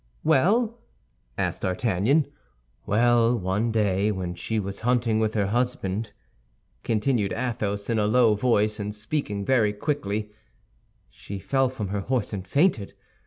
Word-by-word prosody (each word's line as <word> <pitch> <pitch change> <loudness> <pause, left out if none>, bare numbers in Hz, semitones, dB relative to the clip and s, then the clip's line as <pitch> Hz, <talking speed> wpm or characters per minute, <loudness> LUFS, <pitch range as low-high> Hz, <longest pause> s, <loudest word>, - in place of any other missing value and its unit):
"Well?" 225 - +2 0.6
asked - - -2
D'Artagnan. 110 - +1 0.6
"Well, 120 +2 +3
one 105 +4 -1
day 105 -1 +1
when 90 -3 -3
she 110 +5 -3
was 100 -1 -5
hunting 120 -2 +1
with 110 0 0
her 100 -2 +2
husband," 110 -2 -1 0.7
continued 110 -2 0
Athos, 110 -4 -2
in 115 -2 +1
a 105 - +2
low 115 0 +4
voice, 105 -1 +1
and 105 0 -4
speaking 105 -3 -3
very 110 -5 +3
quickly, 105 -4 -2 0.8
"she 100 - -8
fell 135 +6 +1
from 110 -7 -5
her 100 0 -2
horse 120 0 -1
and 95 -2 -5
fainted. 140 - +1
110 Hz, 135 wpm, -25 LUFS, 100-125 Hz, 0.8 s, low